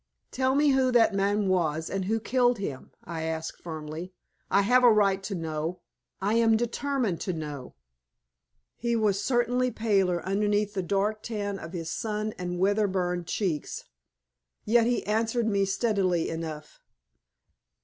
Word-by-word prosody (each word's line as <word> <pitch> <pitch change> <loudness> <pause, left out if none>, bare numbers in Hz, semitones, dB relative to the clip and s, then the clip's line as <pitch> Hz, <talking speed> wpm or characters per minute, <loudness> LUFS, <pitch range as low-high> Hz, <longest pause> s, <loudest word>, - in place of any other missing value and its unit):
"Tell 260 0 +1
me 295 +1 +4
who 265 -2 +3
that 225 -3 +5
man 200 +1 +1
was, 160 -4 +1
and 195 -1 -2
who 220 +3 0
killed 245 +1 +2
him?" 145 -10 -5
I 165 -2 -5
asked, 160 0 -4
firmly. 160 +2 -6 0.4
"I 200 - +4
have 250 +5 +4
a 240 - +8
right 200 -2 +3
to 195 0 -4
know. 160 +1 -3 0.4
I 200 +3 0
am 225 -1 +4
determined 240 -4 -1
to 185 - -2
know!" 150 -5 -6 1.0
He 235 0 0
was 205 -3 +1
certainly 245 0 +1
paler 195 -7 +1
underneath 205 +1 +1
the 195 - -1
dark 200 +4 0
tan 205 -3 -3
of 165 - -9
his 165 -2 -4
sun 215 -1 -2
and 180 0 -3
weather 205 +3 +2
burned 180 -2 -2
cheeks. 175 -8 -2 0.8
Yet 230 +1 +4
he 245 - 0
answered 225 +2 0
me 200 -3 +2
steadily 195 -4 +1
enough. 160 -2 -6
200 Hz, 150 wpm, -27 LUFS, 175-225 Hz, 1.0 s, a